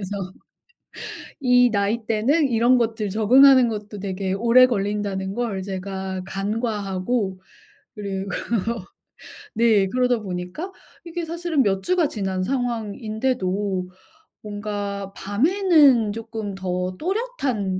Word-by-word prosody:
그래서 195 -1 -5 1.1
이 250 -2 +5
나이대는 225 +7 +1
이런 240 +1 +4
것들 220 -3 -1
적응하는 255 +5 +6
것도 210 -2 -6
되게 190 -1 -3
오래 235 +5 +6
걸린다는 200 -3 -2
걸 220 -5 -2
제가 190 0 -4
간과하고 200 -1 -2 0.6
그리고 195 -1 -4 1.3
네 220 -4 +4
그러다 250 +2 +1
보니까 185 - -5 0.3
이게 340 0 -4
사실은 335 -2 -1
몇 195 -3 +1
주가 360 -3 +2
지난 190 -7 -2
상황인데도 215 -5 -2 0.5
뭔가 205 -1 -5
밤에는 285 - +3
쪼끔 220 -2 -5
더 185 -1 -3
또렷한 285 - -2
210 Hz, 235 characters per minute, -23 LUFS, 195-250 Hz, 1.3 s, 적응하는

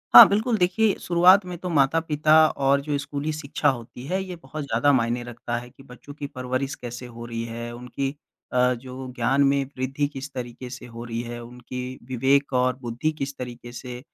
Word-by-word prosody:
हाँ, - - +14
बिल्कुल 220 +3 +1
देखिए 200 +3 +3
शुरुआत 180 +3 +6
में 180 -1 -6
तो 180 - -4
माता-पिता 155 0 +3 0.2
और 140 0 +3
जो 145 0 -1
स्कूली 145 +1 -3
शिक्षा 150 -1 0
होती 125 -1 -5
है 190 +4 0
ये 185 -1 -6
बहुत 155 -2 -7
ज़्यादा 135 +1 +2
मायने 120 -1 +1
रखता 120 0 -4
है 120 +1 -7
कि 135 - -17
बच्चों 135 +2 -12
की 145 -1 -6
परवरिश 130 0 -3
कैसे 120 +1 -7
हो 120 -1 -9
रही 115 -1 -4
है? 115 +1 -6
उनकी 125 +3 -3 0.4
अ, 125 0 +4
जो 125 +1 -9
वो 130 0 -6
ज्ञान 130 +4 +2
में 140 0 +2
वृद्धि 135 +3 0
किस 135 +1 -6
तरीके 125 0 -6
से 125 0 -8
हो 115 -1 -8
रही 115 0 -3
है, 120 0 -6
उनकी 125 +1 -7
विवेक 135 +3 +2
और 125 0 +2
बुद्धि 120 +6 -1
किस 135 0 -3
तरीके 120 -1 -7
से 125 0 -7
130 Hz, 200 wpm, -25 LUFS, 120-145 Hz, 0.4 s, हाँ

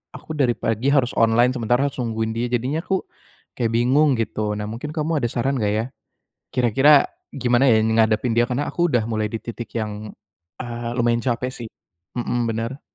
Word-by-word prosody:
aku - - -9
dari 125 -4 +3
pagi 115 +4 -1
harus 130 -4 +3
online, 115 +2 +4
sementara 120 +3 +1
harus - - -14
nungguin 110 -1 -2
dia. 120 +1 -1
Jadinya 130 +6 0
aku 190 0 -1 0.5
kayak 115 -2 -1
bingung, 135 +4 +3
gitu. 105 -1 -1
Nah, 105 - -3
mungkin 120 +7 -6
kamu 155 0 0
ada - - +3
saran 135 +3 0
enggak 105 0 +1
ya, 110 +2 0 0.7
kira-kira 135 - +5 0.3
gimana 125 +1 +2
ya 110 - +5
ngadepin 110 +1 +2
dia? 120 - +5
Karena 135 +4 -1
aku 175 0 +1
udah 115 -3 +2
mulai 110 -1 -1
di 115 - -2
titik 120 0 -7
yang, 105 -1 -5 0.5
eee, 120 -1 -4
lumayan 120 -1 +1
capek 125 0 -1
sih. - - -7 0.5
Mhm, 120 0 -1
bener. 115 +5 -4
120 Hz, 180 wpm, -22 LUFS, 110-130 Hz, 0.7 s, kira-kira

